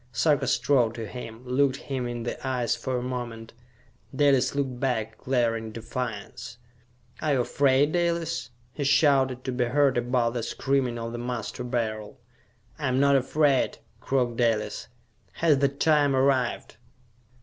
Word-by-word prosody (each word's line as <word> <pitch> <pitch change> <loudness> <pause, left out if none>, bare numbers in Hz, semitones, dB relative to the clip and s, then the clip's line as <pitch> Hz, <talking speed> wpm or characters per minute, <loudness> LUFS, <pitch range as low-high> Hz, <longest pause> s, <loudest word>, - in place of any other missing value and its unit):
Sarka 135 +3 +2
strode 120 -4 +2
to 115 - -5
him, 115 +1 -9
looked 130 +1 +2
him 135 -3 -4
in 120 -1 -4
the 120 - -3
eyes 125 -3 0
for 130 -1 -3
a 120 - -3
moment. 120 -3 -5 0.6
Dalis 140 -2 +3
looked 135 -3 -2
back, 125 -5 -1
glaring 115 -3 0
defiance. 115 0 -6 0.6
"Are 155 -2 +1
you 130 - +2
afraid, 140 +3 +2
Dalis?" 170 -3 -1 0.2
he 145 - -3
shouted, 135 -3 +3
to 130 - -3
be 125 0 0
heard 135 +1 +2
above 120 -1 0
the 120 - -2
screaming 130 +1 -1
of 115 0 -5
the 120 - -5
Master 120 0 -4
Beryl. 115 -1 -3 0.6
"I 145 - -1
am 130 0 +1
not 140 0 +4
afraid," 135 +1 +2 0.2
croaked 125 -3 0
Dalis. 115 -3 0 0.5
"Has 155 -5 +2
the 140 0 +3
time 145 0 +2
arrived?" 130 -4 +1
130 Hz, 150 wpm, -26 LUFS, 120-140 Hz, 0.6 s, not